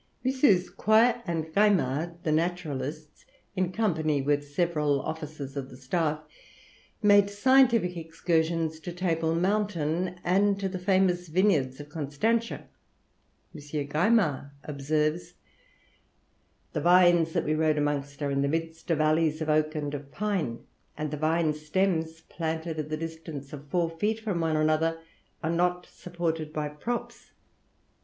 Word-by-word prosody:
MM. 260 -9 +3
Quoy 230 +3 +4
and 165 -2 -1
Gaimard, 170 -6 +2
the 160 - 0
naturalists, 155 -3 -3 0.3
in 185 -1 0
company 160 -8 0
with 145 +1 0
several 150 -3 +1
officers 155 -3 -6
of 135 -2 -4
the 125 - -12
staff, 150 +3 -1 0.8
made 205 -1 +6
scientific 235 -3 +4
excursions 165 -1 -1
to 175 +2 -7
Table 165 -2 0
Mountain 180 -2 0
and 200 +2 +2
to 195 - -1
the 185 -1 -4
famous 180 -1 +2
vineyards 155 -7 +1
of 145 0 -9
Constantia. 165 +11 -1 0.9
M. 155 - -9 0.3
Gaimard 155 - +2
observes, 150 +3 -1 1.4
"The - - -1
vines 175 -2 +5
that - - 0
we 155 - +1
rode 155 -1 +2
amongst 145 -1 -2
are 140 - 0
in 140 0 +1
the 140 - +1
midst 165 +2 -3
of 165 -3 +2
alleys 155 0 +2
of 160 -1 -3
oak 155 +1 +2
and 145 -1 -3
of 140 -1 -7
pine; 190 - -2 0.3
and 150 -1 -3
the 150 - -3
vine 155 +1 +1
stems, 160 +1 -1
planted 160 0 -4
at 155 0 -4
the 155 - -2
distance 160 -3 -7
of 145 0 -9
four 170 +3 +1
feet 210 +7 -1
from 205 -6 -2
one 160 -1 +1
another, 155 +1 +2 0.5
are 160 - 0
not 180 +1 +1
supported 165 -3 -4
by 150 -1 -3
props. 230 +12 -5
160 Hz, 140 wpm, -28 LUFS, 150-180 Hz, 1.4 s, made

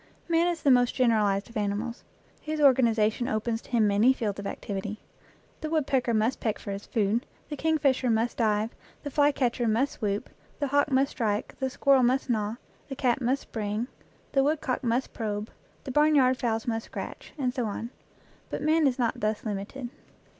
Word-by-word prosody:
Man 335 0 +3
is 345 -2 -2
the 280 - +5
most 245 -1 +4
generalized 210 -5 +2
of 230 - -16
animals; 210 +3 -2 0.4
his 310 0 -3
organization 240 -4 +3
opens 225 -1 -1
to - - -18
him 235 -3 +3
many 210 +6 +4
fields 210 -6 -3
of 200 - -4
activity. 205 +1 -5 0.6
The 310 - -4
wood 310 -3 +1
pecker 255 -3 +1
must 220 +4 +1
peck 220 -3 -1
for 200 - -7
his 200 +1 -6
food, 220 +2 +1 0.3
the 300 - -3
kingfisher 285 -4 +1
must 230 +1 +1
dive, 215 -1 +1 0.3
the 285 - -5
flycatcher 265 -5 +2
must 235 +6 +2
swoop, 205 -1 -3 0.3
the 290 - +1
hawk 285 +1 +3
must 270 +1 +2
strike, 215 -2 -1
the 265 -1 0
squirrel 270 +1 +4
must 255 +1 +2
gnaw, 215 -1 -1 0.3
the 270 - -4
cat 255 -1 +1
must 255 +3 0
spring, 215 +2 -3 0.4
the 270 - +3
woodcock 285 -3 0
must 240 +2 0
probe, 210 -1 -3 0.3
the 265 - -5
barnyard 290 -3 +4
fowls 225 -3 -1
must 225 -1 -2
scratch, - - -7
and 255 -4 0
so 250 -3 -1
on, 225 +3 -5 0.6
but - - -4
man 310 0 +4
is 255 - 0
not 240 -3 0
thus 215 +1 -1
limited. 215 +5 -4
240 Hz, 180 wpm, -27 LUFS, 215-270 Hz, 0.6 s, the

